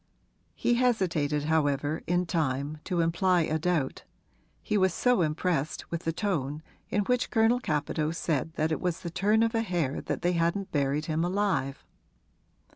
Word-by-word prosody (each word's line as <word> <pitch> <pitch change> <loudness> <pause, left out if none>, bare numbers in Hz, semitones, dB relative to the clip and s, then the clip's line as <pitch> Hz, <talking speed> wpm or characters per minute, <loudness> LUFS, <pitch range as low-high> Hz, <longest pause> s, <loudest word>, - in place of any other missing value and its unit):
He 240 - +1
hesitated 165 - +1
however, 150 -1 +1
in 175 +1 +1
time, 150 -3 -1
to 180 -3 0
imply 175 +2 +2
a 155 0 0
doubt 160 -5 0 0.6
he - - -1
was 190 -3 +3
so 250 -6 +3
impressed 155 -1 -1
with 170 0 -4
the 165 - +1
tone 155 -6 -2 0.3
in 205 - +1
which 250 +4 0
Colonel 225 +1 +3
Capadose 155 -3 -1
said 160 -1 -1
that 155 0 0
it 155 - -1
was 180 -2 -1
the 170 - -5
turn 210 +5 +3
of 230 - +1
a 225 - +2
hair 175 -10 -1
that - - -4
they 175 +1 +2
hadn't 170 +4 0
buried 145 +1 0
him 160 0 0
alive. 180 -7 -1
165 Hz, 165 wpm, -28 LUFS, 150-190 Hz, 0.6 s, was